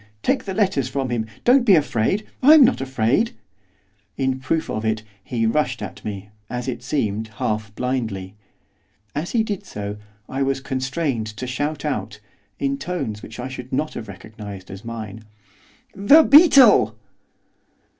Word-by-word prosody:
take 265 - +1
the 195 - -4
letters 185 - +1
from 135 -2 -2
him! 110 -2 -1 0.2
don't 255 +1 +5
be 205 -6 +6
afraid! 150 - +1 0.2
I'm 295 +1 +8
not 245 - +1
afraid!' 135 - +1 0.8
In 130 -1 0
proof 155 +5 -1
of 110 - -3
it, 110 -1 -1 0.2
he 115 0 -1
rushed 125 +1 0
at - - -8
me, 100 -1 -6 0.2
as 125 +1 -4
it 120 -2 -3
seemed 110 -5 -2
half 110 0 -2
blindly. 110 -7 -3 0.8
As 155 +4 -4
he 230 -2 +3
did 205 -4 -4
so 105 0 -6 0.3
I 135 +1 -4
was 135 0 0
constrained 130 -2 -2
to 110 +3 -6
shout 145 +4 -3
out, 105 -7 -3 0.4
in 140 0 -1
tones 135 -10 -4
which 110 +2 -10
I 125 - -4
should 130 -1 -8
not 155 +4 -1
have 110 - -7
recognised 100 -1 -10
as 95 +1 -9
mine, 110 -2 -7 0.7
'THE 240 +12 +6
BEETLE! 275 - +7
130 Hz, 155 wpm, -22 LUFS, 110-155 Hz, 0.8 s, I'm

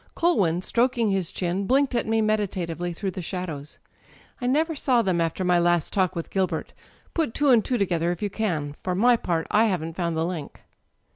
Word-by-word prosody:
Culwin, 190 - +2
stroking 235 -2 +1
his 190 -4 -1
chin, 185 +2 -2
blinked 270 +1 +2
at 235 - 0
me 225 0 +2
meditatively 185 -5 -1
through 190 +3 -3
the 185 - -6
shadows. 165 -5 -5 0.6
"I 245 - -1
never 315 +5 +2
saw 255 -5 +2
them 180 -4 +1
after 165 +3 -1
my 180 -1 +3
last 175 -2 +1
talk 185 -3 +1
with 170 - -5
Gilbert. 190 -1 -1 0.4
Put 320 -9 -1
two 290 -1 +2
and 235 -4 +5
two 250 - 0
together 175 -4 0
if 175 +3 -5
you 205 - -1
can. 160 -10 -2
For 180 -1 -1
my 240 +5 +5
part, 170 -7 -1
I 220 +2 +4
haven't 165 -6 -1
found 170 -3 -1
the 160 - +1
link." 170 -4 -6
185 Hz, 200 wpm, -25 LUFS, 170-225 Hz, 0.6 s, and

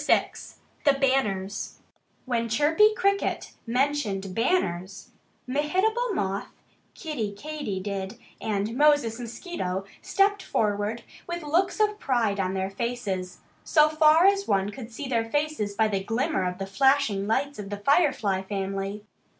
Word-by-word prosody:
VI - - +3 0.5
THE 285 - +5
BANNERS 215 -8 0 0.5
When 235 -3 -1
Chirpy 320 - +4
Cricket 400 0 0 0.2
mentioned 230 -7 0
"banners," 195 - -1 0.4
Mehitable 375 - 0
Moth, 195 - -2 0.5
Kiddie 230 - -4
Katydid, 200 -9 -4 0.2
and 215 +1 -1
Moses 290 -5 +3
Mosquito 225 - -4 0.2
stepped 405 0 +2
forward 210 - -1 0.2
with 345 -1 -4
looks 345 +8 +1
of 420 0 +2
pride 225 -6 0
on 190 0 -1
their 190 0 -2
faces 200 -5 -3 0.2
so 305 -1 +4
far 310 +2 +5
as 395 0 +3
one 195 0 +1
could 240 0 -9
see 270 +5 -6
their 230 -3 0
faces 290 -8 -1
by 220 0 +3
the 195 -2 -1
glimmer 230 - 0
of 180 - -7
the 195 - -4
flashing 210 -1 +2
lights 280 +4 0
of 200 -1 -6
the 205 - -4
Firefly 240 - +2
family. 195 +1 -4
230 Hz, 135 wpm, -26 LUFS, 200-300 Hz, 0.5 s, THE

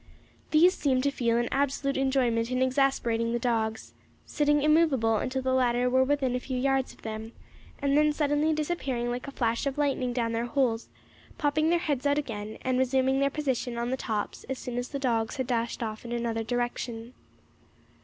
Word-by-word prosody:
These 340 +4 +5
seemed 260 -6 +1
to 280 - +2
feel 235 -4 +1
an 240 0 +1
absolute 275 0 0
enjoyment 255 -4 +1
in 255 0 +1
exasperating 250 -4 +1
the - - +1
dogs, 225 -2 -1 0.3
sitting 295 -1 +1
immovable 295 -8 +3
until 260 +4 -2
the 260 0 +1
latter 250 -1 +2
were 260 +1 +4
within 270 -2 +1
a - - 0
few 255 0 -4
yards 270 0 +1
of - - -19
them, 220 +1 -6 0.5
and 280 0 +1
then 300 0 +4
suddenly 295 +1 +1
disappearing 280 -6 -1
like 245 +2 -4
a - - -5
flash 235 0 -1
of 275 +1 -3
lightning 275 -4 0
down 235 -2 -1
their 230 +1 -1
holes, 240 -3 0 0.5
popping 310 +1 +1
their 345 - +4
heads 290 -6 -1
out 285 0 +2
again 215 -7 -4
and 255 0 +1
resuming 265 +1 +2
their 275 0 +3
position 260 -5 -2
on 235 +1 -2
the - - +1
tops 215 -5 -3
as 265 0 -4
soon 245 -1 -4
as 245 - -4
the 280 - -4
dogs 230 -5 0
had 260 -2 -2
dashed 235 -1 -1
off 215 -1 -5
in 235 - -7
another 235 -1 -1
direction. 240 0 -3
255 Hz, 195 wpm, -28 LUFS, 235-280 Hz, 0.5 s, These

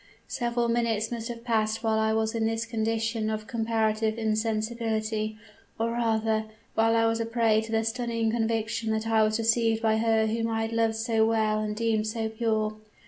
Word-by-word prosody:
Several 240 -1 -1
minutes 230 -2 0
must 230 -1 -4
have 235 -1 -7
passed 220 -1 0
while 220 -1 +2
I 220 0 +2
was 220 0 0
in 225 -1 0
this 225 0 -1
condition 225 -1 -1
of 215 0 -3
comparative 220 -1 0
insensibility; 220 0 -1 0.4
or 230 +1 0
rather 220 -2 0 0.3
while 225 +1 +3
I 225 0 +3
was 225 0 +1
a 230 - -1
prey 225 -2 +2
to 220 0 -8
the 225 0 +1
stunning 230 -1 -1
conviction 225 0 -1
that 220 0 -1
I 225 -1 +3
was 215 0 +2
deceived 225 0 +2
by 220 -1 +3
her 220 0 +2
whom 225 +1 -1
I 225 -1 -1
had 225 - -3
loved 225 -1 +1
so 225 0 +1
well 215 -1 +1
and 210 0 -2
deemed 220 -1 0
so 220 0 -2
pure. 220 -1 -1
225 Hz, 190 wpm, -27 LUFS, 220-230 Hz, 0.4 s, while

